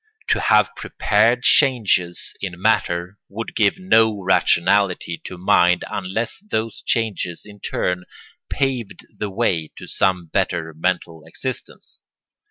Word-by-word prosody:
To - - +3
have - - +3
prepared 115 +4 +1
changes 115 - +2
in 90 -3 -5
matter 90 -2 0
would 115 +3 -6
give 110 - +2
no 110 - +3
rationality 90 -1 +2
to 90 - -7
mind 90 0 +3
unless 100 +4 -3
those 115 - -4
changes 105 -7 -1
in 105 -1 -14
turn 90 -1 -2 0.4
paved 130 -6 -2
the 105 - -4
way 95 -6 -1
to - - -9
some 90 -2 0
better 85 -1 -2
mental 85 -1 -2
existence. - - -7
100 Hz, 120 wpm, -21 LUFS, 90-110 Hz, 0.4 s, To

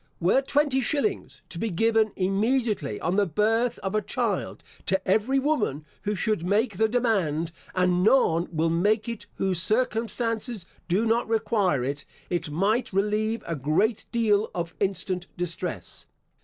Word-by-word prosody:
Were 185 +10 +3
twenty 280 -1 +1
shillings 300 - -1
to 170 - -7
be 225 - -1
given 220 +3 +2
immediately 210 - 0
on 175 +3 0
the 205 -1 +3
birth 225 +7 +1
of 195 0 -2
a 215 - +2
child, - - -2 0.2
to 190 +1 0
every 220 +8 +2
woman 240 - 0 0.2
who 210 0 -1
should 210 -2 0
make 205 +4 +1
the 220 - +3
demand, 190 -10 +1 0.2
and 180 -1 +2
none 180 -8 +4
will 165 0 +1
make 210 +7 +2
it 230 -2 -6
whose 185 -3 0
circumstances 225 -1 0 0.2
do 190 +6 +1
not 230 +1 +1
require 205 - +1
it, 140 +3 -3 0.3
it 175 -2 -1
might 200 - +1
relieve 210 +3 0
a 165 - -2
great 155 - +1
deal 220 -3 +2
of 170 -1 -3
instant 190 -2 -1
distress. 175 - -3
205 Hz, 150 wpm, -26 LUFS, 175-230 Hz, 0.3 s, none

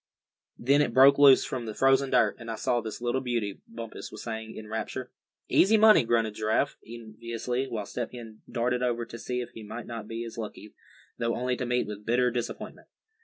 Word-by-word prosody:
Then 140 +4 +3
it 115 - 0
broke 140 +2 +7
loose 140 -2 +7
from 125 -3 -4
the 110 - -5
frozen 135 0 +3
dirt, 110 -5 +3
and 115 -1 -8
I 115 - -2
saw 120 +2 0
this 110 +1 -7
little 120 +2 0
beauty," 115 -6 -2
Bumpus 115 -1 -8
was 110 - -9
saying, 110 -1 -6
in 110 - -8
rapture. 110 +3 -4 0.4
"Easy 215 +4 +5
money!" 215 - +7
grunted 115 -2 +1
Giraffe, 110 +1 0
enviously; 115 +3 -4
while 110 -5 -4
Step 120 +3 -4
Hen 115 -3 -10
darted 125 +1 0
over 120 -1 0
to 115 0 -9
see 125 +1 -3
if 120 - -7
he 115 - -10
might 110 +3 -7
not 115 -3 -7
be 115 +1 -5
as 115 0 -8
lucky, 105 -1 -7 0.5
though 115 0 0
only 125 +1 -1
to 125 0 -4
meet 125 0 +1
with 105 0 -7
bitter 125 +3 +2
disappointment. 120 -1 -5
115 Hz, 205 wpm, -28 LUFS, 110-125 Hz, 0.5 s, broke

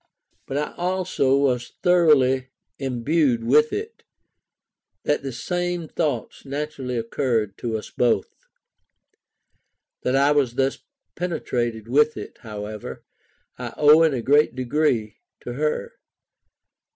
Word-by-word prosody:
But 135 - -3
I 150 - -2
also 180 -7 +1
was 125 -3 +1
so - - -23
thoroughly 145 -8 +4 0.3
imbued 130 -1 +1
with 150 +6 +4
it, 445 +2 -5 1.0
that 150 - +1
the 135 - -4
same 175 +6 -2
thoughts 155 -1 -2
naturally 140 -3 -4
occurred 115 -3 -1
to 115 -2 -2
us 105 - -9
both. 120 -5 +1 1.7
That 125 - 0
I 140 +2 +4
was 135 -5 +2
thus 135 +1 0 0.4
penetrated 120 -10 -2
with 150 +5 +3
it, 105 - -8
however, 105 -1 -7 0.6
I - - -6
owe 150 +2 +7
in 160 -4 +4
a 120 - -3
great 145 -1 +4
degree 130 -3 0 0.2
to - - -6
her. 475 0 -2
135 Hz, 120 wpm, -23 LUFS, 120-155 Hz, 1.7 s, owe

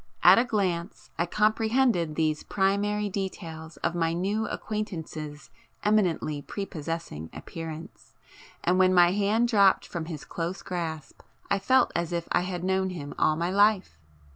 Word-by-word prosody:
At - - +9
a - - +4
glance 185 -7 -2
I 170 - +1
comprehended 215 -4 +2
these 155 -1 0
primary 205 +2 0
details 170 -5 -5
of - - +1
my 165 -1 0
new 200 +6 -1
acquaintance's 160 -9 -5 0.3
eminently 180 -8 +1
prepossessing 165 - -5
appearance, 165 -1 -8 0.5
and 180 +2 +2
when 185 0 +5
my 175 0 +6
hand 210 +4 +2
dropped 200 -5 +4
from 170 -2 -5
his 160 -3 -7
close 175 +3 -4
grasp 160 -5 -5 0.3
I 200 - +3
felt 260 +5 +3
as 170 -1 -1
if 170 -1 -2
I - - +3
had 180 -1 -4
known 190 0 +1
him 150 -6 -6
all 155 - +3
my 170 +3 -1
life! 200 - +3
180 Hz, 145 wpm, -27 LUFS, 165-205 Hz, 0.5 s, At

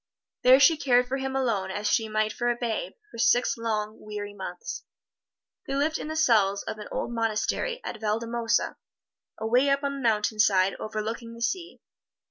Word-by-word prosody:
There 255 +1 +7
she 315 +3 +6
cared 250 -3 +3
for 265 +2 -1
him 265 0 -3
alone 225 -8 0
as 205 +2 -4
she 225 -2 +1
might 215 0 0
for 240 - -1
a 240 - +1
babe, 240 - -2 0.2
for 230 - -10
six 245 +1 +3
long, 215 -2 -3
weary 205 -1 -6
months. 185 -3 -6 0.8
They 275 - -2
lived 305 +3 +1
in - - -5
the 315 - -4
cells 215 -10 +3
of 215 - -6
an 210 - -7
old - - -3
monastery 230 - -1
at 230 - -6
Valdemosa, 230 +2 0 0.6
away 245 +5 +2
up 275 +1 +1
on 280 0 -1
the - - -6
mountainside 210 -3 +2
overlooking 225 +2 -4
the 235 - -12
sea. 345 +7 -3
230 Hz, 175 wpm, -27 LUFS, 215-265 Hz, 0.8 s, There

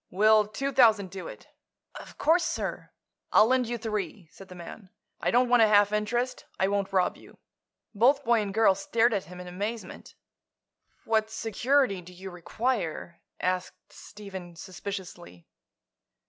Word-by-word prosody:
"Will 215 +2 +4
two 275 +6 -3
thousand 220 -7 +4
do 190 -1 -7
it?" - - -11 0.5
"Of - - -11
course, 335 +2 +3
sir." - - -4 0.4
"I'll 215 - +6
lend 255 0 +2
you 240 +1 -3
three," 205 -6 -4
said 195 - -14
the 180 - -12
man. 180 +3 -10 0.3
"I - - 0
don't 250 +1 +3
want 245 -1 +4
a 220 - +7
half 205 -1 +4
interest. 240 +4 -1
I 190 - +2
won't 200 -1 -1
rob 185 -2 +1
you." - - -17 0.6
Both 265 +7 +3
boy 235 -2 +3
and 205 -1 -3
girl 220 -1 +4
stared 225 +5 +1
at 195 -6 -2
him 180 +2 -11
in 180 - -8
amazement. 200 +2 -6 0.9
"What 220 -1 +1
security 225 0 0
do 180 +1 -14
you 190 +1 -9
require?" 175 -1 -3 0.2
asked 185 0 -3
Stephen, 190 -4 -10
suspiciously. 185 - -8
205 Hz, 155 wpm, -27 LUFS, 185-230 Hz, 0.9 s, a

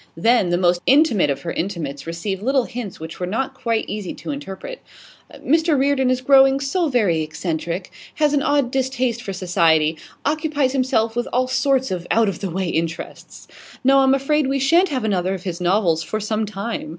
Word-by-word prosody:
Then, 225 0 +3
the 175 - +1
most 175 -1 +2
intimate 265 - +4
of 140 - -2
her 170 - -3
intimates 165 -6 -4
received 185 +4 -4
little 265 +3 +2
hints 235 -6 -7
which 160 +1 -8
were 180 - -2
not 230 +8 -2
quite 230 -3 -1
easy 205 -3 -5
to - - -6
interpret. 285 - -7 0.5
'Mr 320 +1 +1
Reardon 265 -1 +2
is 255 0 0
growing 270 0 +5
so 310 +4 0
very 205 - +1
eccentric 160 +3 -4 0.2
has 300 -1 +2
an 285 - +2
odd 280 -3 +1
distaste 255 -3 -1
for 200 - -5
society 165 -4 +2 0.3
occupies 300 -2 0
himself 235 -4 +1
with 240 0 -1
all 255 +1 +1
sorts 265 -2 +1
of 175 -2 -4
out 225 -2 +3
of 185 - -5
the 195 - -3
way 185 +2 -2
interests. 165 0 -5 0.4
No, 270 +1 +5
I'm 265 0 +4
afraid 285 +1 +1
we 275 +1 0
shan't 335 +8 +3
have 260 -5 -2
another 190 -3 0
of 185 - -9
his 180 -2 -5
novels 175 -3 +2
for 215 +6 -3
some 215 0 -2
time. 200 -4 -5
225 Hz, 190 wpm, -21 LUFS, 180-270 Hz, 0.5 s, growing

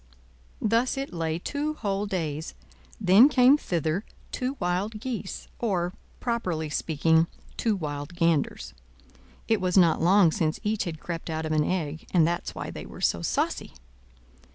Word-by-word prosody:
Thus 230 +5 +1
it 270 -7 -4
lay 165 -1 -1
two 295 - -3
whole 200 -4 -2
days; 160 -5 -3 0.4
then 200 +10 +7
came 260 0 +6
thither 170 - -1 0.3
two 260 +2 -2
wild 190 +5 -1
geese, 225 -5 -5
or, 180 -6 0 0.3
properly 180 -11 -2
speaking, 160 +2 +2 0.3
two 225 -3 +1
wild 145 -2 -5
ganders. 165 -4 0 0.7
It 220 -3 +2
was 185 0 +1
not 170 -4 +5
long 180 0 +5
since 155 0 -1
each 210 0 0
had 160 -3 -5
crept 170 +1 -5
out 160 0 -2
of 155 - -3
an 155 -1 +3
egg, 160 -3 -2
and 165 -3 +6
that's 175 +1 -3
why - - -5
they - - -8
were - - -11
so - - +1
saucy. - - -1
180 Hz, 155 wpm, -27 LUFS, 160-215 Hz, 0.7 s, then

